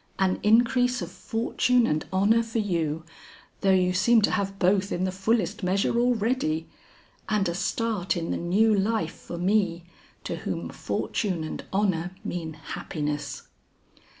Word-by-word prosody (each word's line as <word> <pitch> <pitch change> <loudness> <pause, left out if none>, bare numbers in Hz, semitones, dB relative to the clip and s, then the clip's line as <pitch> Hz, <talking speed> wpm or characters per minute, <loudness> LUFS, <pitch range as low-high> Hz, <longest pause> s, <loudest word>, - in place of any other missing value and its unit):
"An 190 -1 +1
increase 245 +1 +3
of 170 - -7
fortune 230 +5 +1
and 155 -4 -1
honor 205 +5 +4
for 225 0 -4
you, 165 -7 -1 0.6
though 195 - +1
you 180 -1 +4
seem 225 +5 +4
to - - +3
have 195 0 -1
both 190 +1 +2
in 175 - -1
the 185 - 0
fullest 205 +1 0
measure 195 +5 +1
already, 230 -9 +1 0.6
and 210 -3 +2
a 170 - -1
start 195 0 -1
in 165 -1 -3
the - - -1
new 210 +6 +3
life 195 -4 0
for 170 - -8
me 180 -2 +1 0.4
to - - -4
whom - - -4
fortune 185 -7 -2
and 155 - -6
honor 185 -3 0
mean 165 -3 -4
happiness." 150 -1 -4
195 Hz, 150 wpm, -26 LUFS, 175-220 Hz, 0.6 s, honor